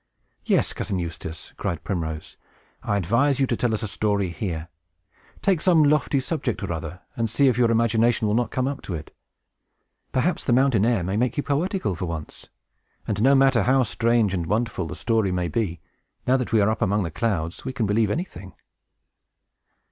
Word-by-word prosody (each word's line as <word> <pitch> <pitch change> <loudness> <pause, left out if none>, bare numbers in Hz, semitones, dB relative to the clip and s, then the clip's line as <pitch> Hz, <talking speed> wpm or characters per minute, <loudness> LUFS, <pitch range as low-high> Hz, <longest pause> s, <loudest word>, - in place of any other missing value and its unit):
"Yes, - - +2
Cousin 100 -3 -3
Eustace," 85 -2 -6
cried 85 - -3
Primrose, 80 -5 -4 0.5
"I 100 - 0
advise 120 - +2
you 135 - +4
to - - -1
tell 120 - 0
us 110 +1 -1
a - - -1
story 100 -2 0
here. 85 -1 -4 0.8
Take 185 -6 +2
some 170 -4 +5
lofty 145 -1 +2
subject 130 -5 -2
or 90 - -2
other, 80 +3 -6
and 115 -1 -1
see 135 +5 +4
if 125 - +1
your 120 -2 +4
imagination 115 0 +2
will 105 - +1
not 120 0 +1
come 130 +2 -1
up 140 0 -3
to 90 - -3
it. 75 -1 -9 1.0
Perhaps 165 +8 0
the 120 - +2
mountain 125 -4 +3
air 115 -7 +2
may 95 +4 -1
make 125 0 0
you 145 - 0
poetical, 155 - -1
for 90 +1 -4
once. 80 -3 -7 0.6
And 105 0 -1
no 135 +4 +5
matter 135 -3 +4
how 130 +5 +3
strange 115 -2 +1
and 85 -3 -2
wonderful 105 -3 -1
the 90 - -6
story 110 -5 +1
may 90 -1 -1
be, 85 -1 -2 0.4
now 130 - +4
that 125 -2 -1
we 110 -2 +4
are 100 - +3
up 110 - -3
among 105 -1 +2
the 85 - -4
clouds, 85 -5 -2
we 130 - -3
can 120 -3 -1
believe 105 +1 +2
anything." 100 - -5
110 Hz, 195 wpm, -24 LUFS, 95-130 Hz, 1.0 s, some